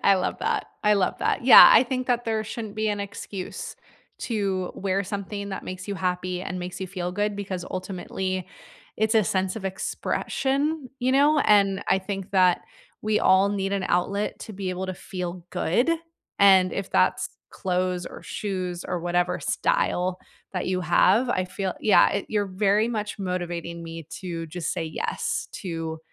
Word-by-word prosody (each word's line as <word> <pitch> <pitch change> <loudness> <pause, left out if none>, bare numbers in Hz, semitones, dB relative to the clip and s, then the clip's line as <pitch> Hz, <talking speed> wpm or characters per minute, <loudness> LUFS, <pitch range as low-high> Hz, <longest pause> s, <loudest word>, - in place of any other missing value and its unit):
I 200 - +7
love 185 -1 -1
that, - - 0 0.2
I 210 0 +5
love 195 -3 +1
that. - - 0
Yeah, 255 - +11
I 225 - +8
think 255 0 -3
that 245 -1 +1
there 220 -1 -1
shouldn't 215 -1 -6
be 215 0 0
an 205 -1 -1
excuse 200 -2 -6 0.5
to 195 -6 -1
wear 195 0 -1
something 200 +1 -5
that 190 - -5
makes 185 +1 -7
you 200 - -2
happy 180 -1 -2
and 185 - -4
makes 180 0 -6
you 190 - -3
feel 180 -1 -4
good 205 +2 -1
because 190 -3 -4
ultimately 185 0 -3 0.5
it's 220 +1 +1
a 220 -3 +5
sense 190 +3 0
of 200 - -7
expression, 275 +8 -1
you 255 +1 +1
know? 290 +3 +4
And 200 -6 +4
I 190 - +4
think 195 0 -6
that 185 -2 +4 0.4
we 215 0 +1
all 190 +1 +5
need 195 -1 -1
an 195 -1 -1
outlet 200 +4 0
to 220 - -8
be 190 -1 -4
able 185 +1 -3
to 185 - -4
feel 180 -1 -6
good, 240 - +1 0.5
and 190 -2 +6
if 195 - -4
that's 90 0 +2 0.2
clothes 180 -1 -1
or - - -9
shoes 185 -4 -4
or 180 -1 -3
whatever 175 +1 0
style 185 - 0 0.3
that 180 - -2
you 185 0 0
have, 195 +8 +4
I 185 -5 0
feel 190 0 -3
yeah, 210 - +5
it 200 - -2
you're 210 -1 0
very 200 +3 +2
much 215 -3 -3
motivating 175 -2 -4
me 165 -1 -8
to 170 -3 -5
just 170 0 -3
say 170 - -2
yes 160 - -3
to 165 -3 -4
190 Hz, 175 wpm, -25 LUFS, 180-210 Hz, 0.5 s, Yeah